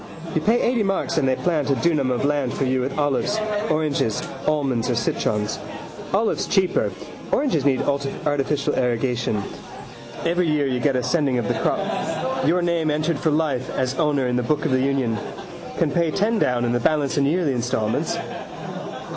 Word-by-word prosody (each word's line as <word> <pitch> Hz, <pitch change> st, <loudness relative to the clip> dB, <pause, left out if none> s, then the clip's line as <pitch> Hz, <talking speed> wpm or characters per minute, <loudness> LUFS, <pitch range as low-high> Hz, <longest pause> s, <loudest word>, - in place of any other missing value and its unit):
You 160 Hz, -, +1 dB
pay 225 Hz, +7 st, +3 dB
eighty 240 Hz, -2 st, +2 dB
marks 195 Hz, -4 st, 0 dB
and 135 Hz, -, +1 dB
they 130 Hz, -, +3 dB
plant 155 Hz, -1 st, 0 dB
a 140 Hz, -, +3 dB
dunam 150 Hz, -4 st, +1 dB
of 125 Hz, +2 st, 0 dB
land 145 Hz, -3 st, 0 dB
for -, -, -1 dB
you 130 Hz, 0 st, +1 dB
with 130 Hz, +2 st, -3 dB
olives, 145 Hz, +8 st, +1 dB, 0.3 s
oranges, 150 Hz, -8 st, 0 dB, 0.2 s
almonds 135 Hz, -6 st, +1 dB
or 120 Hz, -, +1 dB
citrons. 105 Hz, -2 st, -1 dB, 0.5 s
Olives 215 Hz, +3 st, +1 dB
cheaper: 190 Hz, -2 st, +2 dB, 0.4 s
oranges 255 Hz, -, +1 dB
need 135 Hz, -2 st, +3 dB
artificial 140 Hz, 0 st, 0 dB
irrigation. 120 Hz, -3 st, 0 dB, 0.8 s
Every 175 Hz, +1 st, +2 dB
year 150 Hz, -2 st, +2 dB
you 130 Hz, -2 st, 0 dB
get 135 Hz, +1 st, +2 dB
a 125 Hz, -, +1 dB
sending 145 Hz, -6 st, +1 dB
of 120 Hz, -, -1 dB
the -, -, +1 dB
crop. 130 Hz, +1 st, -1 dB
Your 175 Hz, +2 st, +3 dB
name 170 Hz, -2 st, +1 dB
entered 155 Hz, 0 st, 0 dB
for 160 Hz, -, +1 dB
life 150 Hz, -5 st, 0 dB
as 130 Hz, 0 st, -1 dB
owner 145 Hz, -5 st, +2 dB
in 125 Hz, 0 st, 0 dB
the -, -, +2 dB
book 150 Hz, +4 st, 0 dB
of -, -, +1 dB
the 130 Hz, 0 st, +3 dB
union. 130 Hz, -5 st, +1 dB, 0.6 s
Can -, -, +1 dB
pay 170 Hz, -2 st, +2 dB
ten 210 Hz, +7 st, +1 dB
down 120 Hz, -6 st, +1 dB
and 120 Hz, -, +1 dB
the 120 Hz, -, +2 dB
balance 150 Hz, +3 st, +1 dB
in 140 Hz, -, +3 dB
yearly 160 Hz, -2 st, +1 dB
instalments. 120 Hz, -3 st, -1 dB
140 Hz, 180 wpm, -23 LUFS, 125-160 Hz, 0.8 s, pay